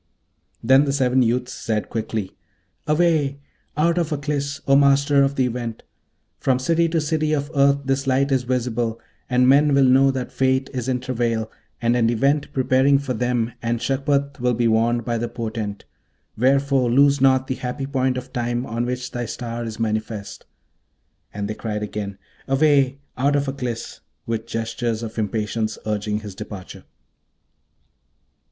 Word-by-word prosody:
Then 135 +4 +5
the 140 - 0
seven 130 -2 +2
youths 125 +1 0
said 110 -2 -2
quickly, 110 -3 -3 0.5
'Away! 150 -3 +2 0.4
out 170 +3 +2
of 165 -2 -1
Aklis, 140 -1 -2
O 135 - +5
Master 140 0 +4
of 140 0 +2
the 130 - +2
Event! 120 -2 -4 0.6
from 130 -2 +2
city 165 +6 +1
to 165 0 +1
city 155 0 0
of 145 0 -2
earth 140 0 +3
this 135 +1 -1
light 135 +2 +2
is 135 -2 +3
visible, 120 -2 -1 0.3
and 125 0 +3
men 140 +2 +5
will 140 -1 +5
know 135 +1 +5
that 130 -2 -3
Fate 130 0 +1
is 125 -2 -3
in 125 -1 0
travail, 115 -3 -1 0.3
and 120 +1 +3
an 115 -2 +3
Event 140 +5 +1
preparing 130 +1 +3
for 135 -2 -3
them, 120 0 -1
and 115 0 -1
Shagpat 140 +2 0
will 125 0 +1
be 120 0 +2
warned 115 +1 +2
by 120 -1 -1
the 120 +1 -2
portent; 110 -3 -5 0.5
wherefore 135 +1 +2
lose 140 +2 +4
not 130 -1 +4
the 130 - -2
happy 130 +2 -4
point 130 -2 0
of 125 +1 -7
time 120 +1 -1
on 115 0 -2
which 125 0 -4
thy 120 -2 -4
star 120 +1 -5
is 110 -1 -6
manifest.' 110 -2 -3 0.8
And 100 0 -4
they 110 - -3
cried 105 -1 -4
again, 100 -1 -5 0.3
'Away! 135 -1 +3 0.2
out 140 +2 +2
of 140 0 0
Aklis!' 125 -4 -4 0.3
with 115 0 -3
gestures 115 0 -2
of 115 0 -5
impatience, 110 +1 -2
urging 105 0 -2
his 105 -2 -8
departure. 95 0 -9
125 Hz, 160 wpm, -22 LUFS, 115-140 Hz, 0.8 s, Then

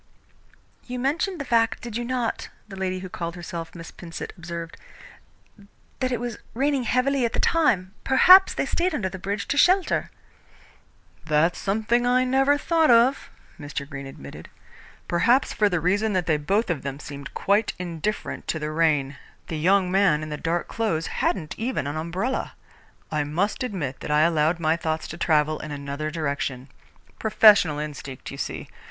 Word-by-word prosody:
"You 250 0 -4
mentioned 310 +8 -1
the 280 - -4
fact, 230 -2 +1
did 235 -2 -6
you 240 - -2
not," 245 -1 -2 0.2
the 200 - -9
lady 185 -1 -3
who 185 - -6
called 170 -1 -5
herself 170 -1 -7
Miss 165 -1 -9
Pinsent 170 -2 -8
observed, 170 -2 -7 1.2
"that 255 -1 0
it 245 - -1
was 240 -1 -5 0.2
raining 275 0 +1
heavily 260 +2 +1
at 235 - 0
the - - -1
time? 210 - +2
Perhaps 365 +9 +7
they - - 0
stayed 350 -1 0
under 190 -9 -1
the 190 - -8
bridge 200 +2 -3
to 285 - 0
shelter." 365 +4 +3 1.1
"That's 160 +2 +2
something 220 +4 +1
I 250 +1 +3
never 270 +3 +3
thought 325 +1 +2
of," 240 +3 +4 0.3
Mr. 145 -1 -5
Greene 140 -2 -7
admitted, 70 - -11 0.6
"perhaps 235 +10 +2
for 210 -1 +2
the 180 -3 0
reason 205 +6 +1
that 185 -2 0
they 155 -2 +2
both 195 +8 0
of 155 - -2
them 140 0 -5
seemed 140 -1 -9
quite 205 +2 +1
indifferent 180 +3 -4
to - - -1
the 155 0 -4
rain. 150 -4 +1 0.3
The 160 - -3
young 185 +2 +3
man 190 -6 +3
in 155 - -6
the 150 - -3
dark 165 +3 -2
clothes 210 -9 -1 0.2
hadn't 160 -6 -1
even 235 - -2
an 145 +2 -3
umbrella. 175 +11 -2 0.6
I 150 -1 0
must 180 - -1
admit 180 - -3
that - - -7
I 150 0 +3
allowed 160 0 +2
my 160 -1 +2
thoughts 160 -1 -3
to 165 - -7
travel 155 -2 +2
in 155 - -7
another 145 +1 -4
direction. 140 -4 -3 0.5
Professional 210 -8 +5
instinct, 140 -3 -7
you - - -8
see. - - -4
180 Hz, 170 wpm, -24 LUFS, 155-235 Hz, 1.2 s, Perhaps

